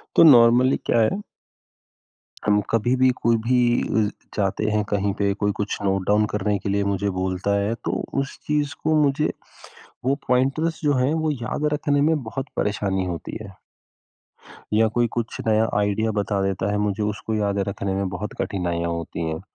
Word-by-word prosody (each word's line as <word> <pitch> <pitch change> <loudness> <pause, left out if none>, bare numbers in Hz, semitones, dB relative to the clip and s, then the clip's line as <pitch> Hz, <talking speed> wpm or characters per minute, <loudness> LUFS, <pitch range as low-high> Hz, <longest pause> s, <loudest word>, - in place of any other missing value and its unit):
तो - - +7
नॉर्मली 125 -2 +6
क्या 115 - +2
है 150 - +1 1.3
हम 105 0 +4
कभी 115 +3 +2
भी 130 0 +4
कोई 115 0 +3
भी 125 +1 +3 0.5
अ, - - -2 0.3
जाते 100 +1 0
हैं 105 0 +1
कहीं 100 -1 0
पे 100 0 +2
कोई 105 0 +2
कुछ 105 0 -2
नोट 95 -1 +1
डाउन 105 +1 +4
करने 105 0 0
के 100 - -4
लिए 100 0 +1
मुझे 100 +1 -1
बोलता 95 +2 0
है 100 +3 0
तो - - 0 0.3
उस 135 - -7
चीज़ 150 -1 0
को 155 0 +2
मुझे, 145 +1 +1 0.7
वो 135 +2 +2
पॉइंटर्स 135 +6 +1
जो 145 -1 +3
हैं 130 +4 +2
वो 155 - +1
याद 135 +2 -3
रखने 145 -1 +1
में 160 +2 +3
बहुत 130 +4 -5
परेशानी 95 -2 0
होती 85 -2 -5
है। 100 -3 -10 1.2
या 110 +1 +4
कोई 120 -1 +3
कुछ 115 -1 -3
नया 110 0 +3
आइडिया 105 +2 0
बता 100 -1 -1
देता 95 0 -1
है 105 - 0
मुझे 105 0 -1
उसको 105 +1 -3
याद 100 -1 0
रखने 100 0 -3
में 100 0 -1
बहुत 100 +3 -5
कठिनाइयाँ 85 -3 -2
होती 85 0 -4
हैं। 80 0 -3
105 Hz, 180 wpm, -23 LUFS, 100-125 Hz, 1.3 s, तो